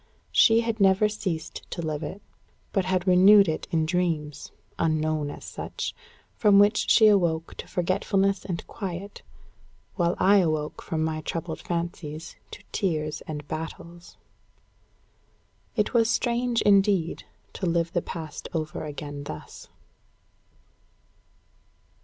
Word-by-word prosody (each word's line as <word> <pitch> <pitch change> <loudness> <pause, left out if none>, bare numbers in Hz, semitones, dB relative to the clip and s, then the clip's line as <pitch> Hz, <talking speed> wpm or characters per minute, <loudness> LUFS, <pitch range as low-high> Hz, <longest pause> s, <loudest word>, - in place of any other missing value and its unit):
She 225 +1 +5
had 230 -1 -2
never 195 +1 +4
ceased 180 -6 -5
to - - -6
live 155 -1 -3
it; 200 +4 -7 0.5
but 195 -2 0
had 185 -1 0
renewed 195 +2 +7
it 155 - -2
in 160 -1 +1
dreams, 160 -4 -2 0.3
unknown 155 -2 0
as - - -9
such, - - -5 0.4
from 205 -3 +4
which 205 +2 +4
she 220 - +6
awoke 170 -6 +3
to - - -7
forgetfulness 195 +2 0
and 175 -3 -4
quiet, 195 0 -6 0.8
while 175 -1 +1
I 200 +2 +5
awoke 155 -5 0
from 160 -1 -2
my 155 0 -2
troubled 165 +1 -4
fancies 170 -2 -5
to - - -11
tears 155 -6 -1
and 150 -2 -6
battles. 170 +2 -7 1.6
It 210 +2 0
was 230 -2 +3
strange, 240 0 +1
indeed, 195 -4 +3 0.3
to 185 - -3
live 170 0 0
the 175 - +1
past 160 -4 -7
over 155 -1 -3
again 145 -1 -7
thus. - - -9
175 Hz, 125 wpm, -26 LUFS, 155-200 Hz, 1.6 s, renewed